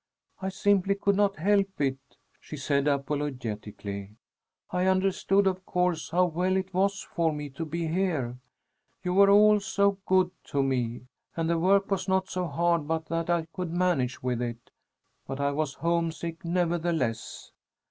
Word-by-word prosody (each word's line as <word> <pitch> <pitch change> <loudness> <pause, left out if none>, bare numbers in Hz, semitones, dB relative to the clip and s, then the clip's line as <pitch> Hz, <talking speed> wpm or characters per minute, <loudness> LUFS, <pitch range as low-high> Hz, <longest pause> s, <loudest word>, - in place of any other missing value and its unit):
"I 190 - -1
simply 200 0 +2
could 200 0 +1
not 200 0 +2
help 195 +3 +1
it," 135 -2 0 0.4
she 155 - -9
said 140 +1 0
apologetically. 115 -8 -3 0.6
"I 180 +1 +1
understood, 195 +1 +2
of 185 -1 0
course, 180 -3 0
how 180 +3 +3
well 180 +2 0
it 190 0 -3
was 195 +1 +1
for 165 -2 +2
me 150 -2 -5
to 150 +5 -5
be 165 +2 -3
here; 160 -8 -1 0.6
you 180 -1 -1
were 200 +1 +6
all 210 +1 +6
so 200 0 +1
good 185 -1 +3
to 140 -1 0
me, 125 -3 -1 0.3
and 165 -1 0
the 170 0 +1
work 195 +3 +3
was 190 -1 0
not 190 0 +1
so 180 -1 -1
hard 170 0 +1
but 160 0 -1
that 165 0 -2
I 170 -2 +1
could 180 -2 -4
manage 160 -9 0
with 125 -1 -1
it, 120 -1 -5 0.6
but 135 - -5
I 140 0 +1
was 145 -1 -2
homesick 165 -1 -2
nevertheless. 170 -8 -1
170 Hz, 160 wpm, -28 LUFS, 140-190 Hz, 0.6 s, were